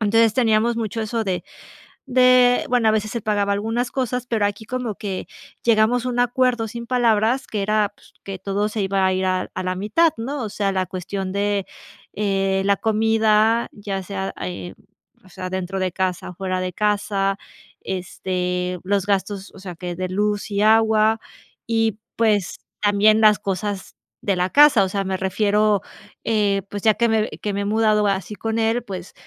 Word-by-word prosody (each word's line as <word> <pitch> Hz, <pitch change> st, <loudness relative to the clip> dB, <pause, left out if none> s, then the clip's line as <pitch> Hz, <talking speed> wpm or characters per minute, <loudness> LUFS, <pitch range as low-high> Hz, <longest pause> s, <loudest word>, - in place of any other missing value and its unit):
Entonces 225 Hz, +1 st, +3 dB
teníamos 230 Hz, -1 st, +2 dB
mucho 225 Hz, 0 st, -3 dB
eso 225 Hz, +1 st, -2 dB
de, 180 Hz, -3 st, -2 dB, 0.6 s
de 250 Hz, -1 st, +4 dB
bueno, 240 Hz, -3 st, +3 dB
a -, -, +4 dB
veces 215 Hz, +1 st, -1 dB
él 235 Hz, -, -2 dB
pagaba 205 Hz, -1 st, +1 dB
algunas 225 Hz, +4 st, -2 dB
cosas, 250 Hz, -2 st, -2 dB
pero 225 Hz, -4 st, +1 dB
aquí 205 Hz, +2 st, -3 dB
como 245 Hz, -2 st, -3 dB
que 195 Hz, -2 st, -5 dB, 0.4 s
llegamos 230 Hz, +2 st, +3 dB
a -, -, 0 dB
un 245 Hz, 0 st, -2 dB
acuerdo 245 Hz, -1 st, +1 dB
sin 235 Hz, +1 st, -7 dB
palabras 240 Hz, +1 st, +2 dB
que 210 Hz, -, -3 dB
era 210 Hz, 0 st, +1 dB
pues, -, -, -22 dB
que 195 Hz, -1 st, -6 dB
todo 200 Hz, +2 st, -1 dB
se 215 Hz, 0 st, -3 dB
iba 195 Hz, 0 st, +1 dB
a 190 Hz, -, +2 dB
ir 185 Hz, 0 st, -1 dB
a 185 Hz, 0 st, -1 dB
a 185 Hz, -, -4 dB
la 185 Hz, 0 st, -2 dB
mitad, 215 Hz, -, +2 dB
¿no? 270 Hz, +5 st, -4 dB
O 215 Hz, -, -4 dB
sea, 200 Hz, -1 st, -1 dB
la 185 Hz, -1 st, -1 dB
cuestión 185 Hz, +1 st, -4 dB
de, 200 Hz, 0 st, 0 dB, 0.5 s
eh, 195 Hz, -1 st, 0 dB
la 200 Hz, 0 st, +4 dB
comida, 220 Hz, +1 st, +2 dB
ya 200 Hz, -2 st, -5 dB
sea, 195 Hz, 0 st, -4 dB
eh, 90 Hz, 0 st, -5 dB, 0.5 s
o -, -, -17 dB
sea, 185 Hz, 0 st, -6 dB
dentro 190 Hz, +1 st, -3 dB
de 185 Hz, -1 st, -1 dB
casa 185 Hz, -2 st, -2 dB
o -, -, -14 dB
fuera 185 Hz, 0 st, -2 dB
de 180 Hz, -1 st, -3 dB
casa. 205 Hz, -1 st, 0 dB, 0.5 s
Este, 180 Hz, -1 st, -3 dB
los 195 Hz, 0 st, 0 dB
gastos, 200 Hz, 0 st, -2 dB
o 195 Hz, -, -13 dB
sea 185 Hz, -2 st, -8 dB
que 175 Hz, +1 st, -5 dB
de 185 Hz, 0 st, -2 dB
luz 205 Hz, +2 st, -1 dB
y 200 Hz, -, 0 dB
agua, 220 Hz, 0 st, +4 dB, 0.5 s
y 225 Hz, -2 st, +1 dB, 0.2 s
pues 210 Hz, -5 st, +1 dB, 0.2 s
también 210 Hz, +1 st, +4 dB
las 215 Hz, -1 st, +6 dB
cosas 195 Hz, 0 st, -4 dB, 0.3 s
de 195 Hz, -3 st, 0 dB
la 180 Hz, +1 st, +1 dB
casa. 290 Hz, -8 st, +7 dB
O -, -, -4 dB
sea, 195 Hz, +1 st, -1 dB
me 190 Hz, 0 st, -1 dB
refiero, 205 Hz, +2 st, +2 dB, 0.4 s
eh, 205 Hz, -3 st, +1 dB
pues 205 Hz, -, -5 dB
ya 220 Hz, -, +5 dB
que 235 Hz, +1 st, +2 dB
me 220 Hz, -1 st, +2 dB
que 205 Hz, -, -5 dB
me 200 Hz, -, -1 dB
he -, -, -2 dB
mudado 215 Hz, 0 st, +2 dB
así 195 Hz, +1 st, -2 dB
con 225 Hz, +1 st, -3 dB
él, 225 Hz, +2 st, +1 dB
pues 190 Hz, -4 st, -7 dB
205 Hz, 190 wpm, -22 LUFS, 190-225 Hz, 0.6 s, casa